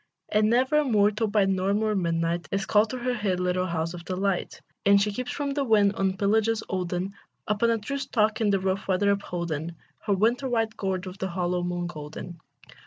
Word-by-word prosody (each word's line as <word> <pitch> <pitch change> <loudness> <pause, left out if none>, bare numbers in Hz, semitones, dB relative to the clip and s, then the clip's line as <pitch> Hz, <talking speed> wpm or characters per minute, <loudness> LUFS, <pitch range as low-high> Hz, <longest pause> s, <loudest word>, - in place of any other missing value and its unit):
And 215 0 +3
never 260 +6 +3
a - - +2
mortal 215 -3 +2
by 205 -1 +3
morn 195 +2 +1
or 215 -1 +1
midnight 170 -2 -1
Is 195 0 -1
called 210 +2 +3
to 255 - -4
her 250 0 -1
hid 205 -6 -1
little 180 0 0
house 165 0 -2
of 175 -1 -8
delight; 190 +1 -2 0.2
And 200 0 +6
she 210 +1 +1
keeps 250 +4 -4
from 285 -1 -2
the 280 0 0
wind, 210 -5 +4
on 195 -1 0
his 190 - -1
pillages 220 +2 +1
olden, 185 +1 -2 0.3
Upon 210 +3 +2
a 230 - +2
true 280 +7 -4
stalk 220 -5 0
in 215 - +3
rough 195 0 0
weather 200 +2 +2
upholden, 170 -4 -3 0.3
Her 205 - +3
winter 235 +7 +1
white 225 -2 0
gourd 190 -1 -2
with 185 +1 -8
the 190 - -1
hollow 180 0 -1
moon 175 0 -2
golden. 165 +1 -8
200 Hz, 205 wpm, -26 LUFS, 180-220 Hz, 0.3 s, And